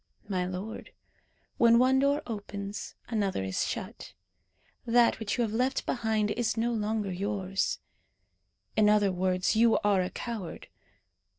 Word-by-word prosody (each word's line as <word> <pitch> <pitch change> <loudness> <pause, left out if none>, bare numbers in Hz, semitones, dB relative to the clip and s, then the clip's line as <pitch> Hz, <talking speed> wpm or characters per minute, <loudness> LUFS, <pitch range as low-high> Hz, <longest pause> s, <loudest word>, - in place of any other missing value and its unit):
'My 185 -3 -1
lord, 190 - -6 0.7
when 235 0 +6
one 260 +2 +4
door 285 +2 +2
opens 205 -2 -6
another 200 - -1
is 95 -1 -1
shut. - - -6 0.7
That 240 0 +3
which 220 0 -2
you 240 - +2
have 220 -2 -2
left 255 +4 0
behind 220 -3 0
is 235 0 -1
no 235 +1 +1
longer 215 -2 -1
yours.' 195 0 -1 1.0
In 210 -1 +5
other 205 -2 +4
words, 185 +1 +1
you 230 +1 +5
are 200 -2 +3
a 180 - -2
coward. 220 -8 -6
210 Hz, 135 wpm, -29 LUFS, 195-235 Hz, 1.0 s, when